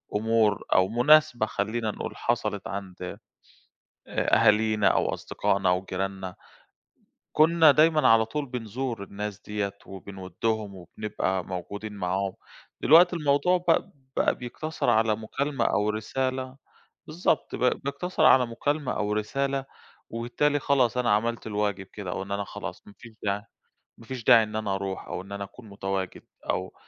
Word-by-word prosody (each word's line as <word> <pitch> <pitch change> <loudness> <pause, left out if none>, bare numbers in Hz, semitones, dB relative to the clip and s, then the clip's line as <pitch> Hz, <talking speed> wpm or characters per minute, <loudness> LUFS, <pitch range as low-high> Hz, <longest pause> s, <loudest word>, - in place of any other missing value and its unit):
أمور 110 -1 +2
أو 95 0 +4
مناسبة 125 0 +4
خلّينا 110 +1 -2
نقول، - - -6
حصلت 105 -4 -1
عند 95 -2 -6 1.1
آآ - - +1
أهالينا 110 -1 +4
أو - - +2
أصدقائنا 95 -1 0
أو 90 +1 +1
جِيراننا، 95 -1 -4 1.0
كُنّا 160 0 +6
دايمًا 155 -1 +4
على 115 0 +6
طول 145 +4 -3
بنزور 120 -2 -4
الناس 105 +1 -6
دِيَّة 105 -1 -3
وبنودّهم 100 +2 -4
وبنبقى 95 0 -3
موجودين 100 +4 -6
معاهم، 95 0 -2 0.5
دلوقتي 175 +3 +6
الموضوع 150 +4 +2
بق 165 - +4 0.3
بقى - - +3
بيقتصر 130 +2 -3
على 110 -1 +3
مُكالمة 135 +4 -2
أو 105 +1 +1
رسالة 130 +4 -3 0.5
بالضبط، 160 0 0
ب 125 - -1 0.2
بيقتصر 155 +4 -1
على 130 -5 +6
مكالمة 145 +4 -1
أو 105 -1 -1
رسالة، 135 +6 -1 0.5
وبالتالي 120 +6 0
خلاص 130 -3 +2
أنا 120 -3 +2
عملت 115 +2 0
الواجب 105 -2 -1
كده، 95 -2 -7
أو - - -3
إن 100 - -7
أنا 100 0 -1
خلاص - - -7
ما 100 - -14
فيش 115 -2 -13
داعي 100 0 0 0.6
ما 115 - -14
فيش 125 -1 -6
داعي 115 -2 +7
إن 105 0 -6
أنا 105 -3 -1
أروح 95 -1 -4
أو - - -4
إن 100 +1 -14
أنا 100 0 -4
أكون 110 +2 -12
متواجد، 95 -1 -4 0.3
أو - - -3
110 Hz, 145 wpm, -27 LUFS, 100-130 Hz, 1.1 s, داعي